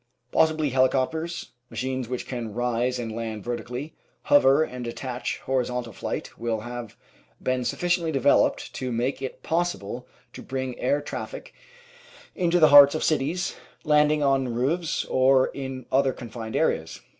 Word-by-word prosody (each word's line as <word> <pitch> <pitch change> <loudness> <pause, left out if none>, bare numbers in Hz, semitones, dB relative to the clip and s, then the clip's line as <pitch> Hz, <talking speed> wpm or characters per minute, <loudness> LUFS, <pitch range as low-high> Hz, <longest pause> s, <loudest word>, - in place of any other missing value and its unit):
Possibly 155 -2 +2
heli 130 0 +4
copters, 160 +6 -2 0.2
machines 130 -2 -3
which 125 -1 -4
can 115 -4 -5
rise 125 +1 0
and 115 -2 -4
land 110 -2 -5
vertically, 125 +5 -5 0.3
hover 145 +1 +5
and 125 -5 -6
attain 125 +1 -5 0.2
horizontal 125 -3 -1
flight, - - -5
will 115 -2 -1
have 120 -1 -7 0.4
been 130 0 -1
sufficiently 175 +4 0
developed 140 -1 +2
to 130 -1 -4
make 125 +4 -1
it 135 - -6
possible 160 -9 -2 0.3
to - - -9
bring 130 -1 -4
air 140 +3 +1
traffic - - -7 0.8
into 175 -1 +2
the 155 -2 +7
hearts 145 0 +9
of 155 - -1
cities, 155 +5 0 0.3
land 150 -1 +4
ing 150 -1 +1
on 135 -2 +2
roofs 150 +7 0
or 130 0 +4
in 130 -2 -6
other 135 0 +3
confined 115 -2 -7
areas. - - 0
130 Hz, 145 wpm, -25 LUFS, 120-150 Hz, 0.8 s, hearts